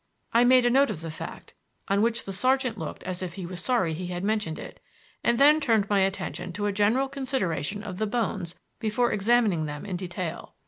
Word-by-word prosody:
I 235 +1 +6
made 255 0 +6
a 240 - +4
note 275 +1 +4
of 180 -7 -4
the 165 -1 -5
fact 160 - -8 0.3
(on 200 +1 +2
which 230 +1 +1
the 195 - -6
sergeant 255 +2 +1
looked 160 -7 -6
as 185 0 -4
if 175 -2 -5
he 190 - -5
was 175 0 -6
sorry 210 -11 +1
he 180 +3 -4
had 175 0 -4
mentioned 210 -6 -1
it), - - -9 0.4
and 235 - +3
then 295 +3 +6
turned 225 -8 +2
my 200 - +4
attention 190 -1 -2
to 205 +3 -3
a 205 - +1
general 215 +7 +2
consideration 210 - -2
of 185 -3 -6
the 215 - 0
bones 205 -6 -2 0.2
before 235 +2 +1
examining 210 -5 +2
them 150 +2 -6
in 185 -3 -3
detail. 180 -1 -5
205 Hz, 215 wpm, -27 LUFS, 180-240 Hz, 0.4 s, I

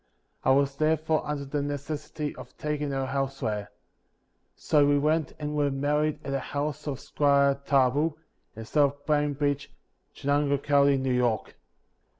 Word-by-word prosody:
I - - +2
was, 140 +1 +3
therefore, 155 0 +1
under 145 -1 -3
the 145 +1 -2
necessity 145 +1 -4
of 130 -1 -12
taking 150 -1 -2
her 135 -1 -1
elsewhere; 130 -7 -2 0.9
so 150 -1 +3
we 145 0 +4
went 155 +1 +1
and 150 0 -4
were 145 -1 +2
married 150 +2 0
at 140 - -3
the 135 - 0
house 145 +2 -4
of 140 -3 -3
Squire 140 -1 +2
Tarbill, 145 +3 +2 0.4
in 110 0 -7
South 145 +2 +1
Bainbridge, 145 -1 0 0.4
Chenango 145 0 +1
county, 140 0 +3
New 130 -1 0
York. 120 -3 0
145 Hz, 145 wpm, -27 LUFS, 135-150 Hz, 0.9 s, we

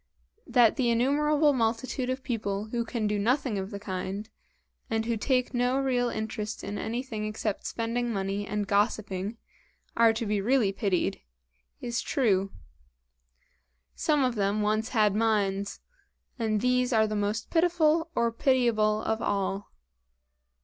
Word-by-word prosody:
That 240 -1 +4
the 250 -3 +2
innumerable 290 +5 +3
multitude 250 +2 -1
of 260 0 -3
people 215 -4 -3
who 235 +1 -1
can 230 -1 -3
do 210 0 0
nothing 245 0 +1
of 190 0 -4
the 200 -2 -6
kind, 195 +1 -4 0.6
and 225 0 0
who 230 0 0
take 250 +3 0
no 245 +1 +1
real 250 -3 +1
interest 220 -1 -4
in 200 +1 -4
anything 230 -1 -3
except 215 -1 -3
spending 235 +1 -2
money 200 0 -2
and 210 0 -2
gossiping, 205 0 0 0.6
are 230 -1 +6
to 225 +1 -3
be 210 -1 0
really 230 -2 +2
pitied, 195 -4 -1 0.6
is 235 -1 -2
true. 195 -7 +1 1.4
Some 300 -3 +1
of 250 -1 +1
them 205 0 0
once 215 +2 0
had 215 -4 +3
minds 200 -2 0 0.6
and 215 -2 0
these 250 0 +2
are 220 -2 +4
the 215 0 -3
most 210 +1 -2
pitiful 330 -1 +3
or 235 0 +2
pitiable 230 -4 +2
of 220 0 -1
all. 200 0 -2
225 Hz, 140 wpm, -28 LUFS, 205-250 Hz, 1.4 s, are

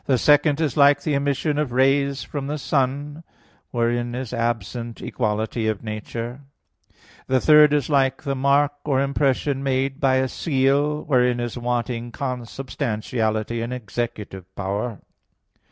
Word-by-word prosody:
The 130 - +3
second 145 +3 +4
is 155 -7 0
like 145 0 +5
the 155 - 0
emission 140 +2 0
of 150 -5 -1
rays 135 +2 +2
from 140 -2 -5
the 150 +1 -2
sun; 145 +2 -1 0.5
wherein 120 0 -1
is 125 -2 -5
absent 115 0 -3
equality 110 0 -2
of 110 -1 -2
nature. 115 +3 -5 0.9
The 130 0 +3
third 150 +1 +7
is 145 -4 +1
like 135 -2 +1
the 140 -2 -1
mark 140 +2 +2
or 135 -3 +1
impression 140 0 0
made 135 +1 -1
by 135 -3 +3
a 130 0 +2
seal; 145 +1 +1
wherein 125 -4 +2
is 120 -1 -3
wanting 120 -1 -2
consubstantiality 115 -3 -3
and 115 +2 -4
executive 110 -5 -5
power. 100 +4 -3
130 Hz, 135 wpm, -23 LUFS, 120-140 Hz, 0.9 s, third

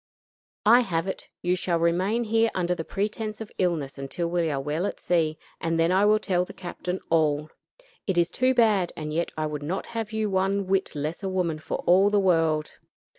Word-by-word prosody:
I 235 +3 +8
have 175 -9 0
it; 190 - -5
you 180 +1 +2
shall 175 -2 0
remain 185 +8 +1
here 225 0 +2
under 180 -1 +1
the 165 - -4
pretense 215 +3 -3
of 220 -2 -7
illness 160 -7 -1
until 140 +5 -3
we 170 -2 +1
are 140 -2 -1
well 150 +7 -1
at - - -6
sea, 160 -3 +1 0.2
and 165 0 -1
then 165 +1 +3
I 190 +2 +4
will 210 +1 +5
tell 185 -4 0
the - - -9
captain 180 0 -5
all. 155 -2 +2 0.6
It 190 -3 0
is 175 0 +3
too 255 +4 +2
bad; 210 -7 +3
and 150 -1 -4
yet 170 +2 0
I 155 - 0
would 150 -1 -4
not 170 +7 -3
have 225 -1 -3
you 220 -1 -1
one 195 0 0
whit 190 -2 0
less 150 +5 -3
a 195 - -2
woman 175 -4 -1
for - - -4
all 190 +3 +5
the 205 0 +3
world. 165 -5 +2
180 Hz, 210 wpm, -26 LUFS, 165-200 Hz, 0.6 s, I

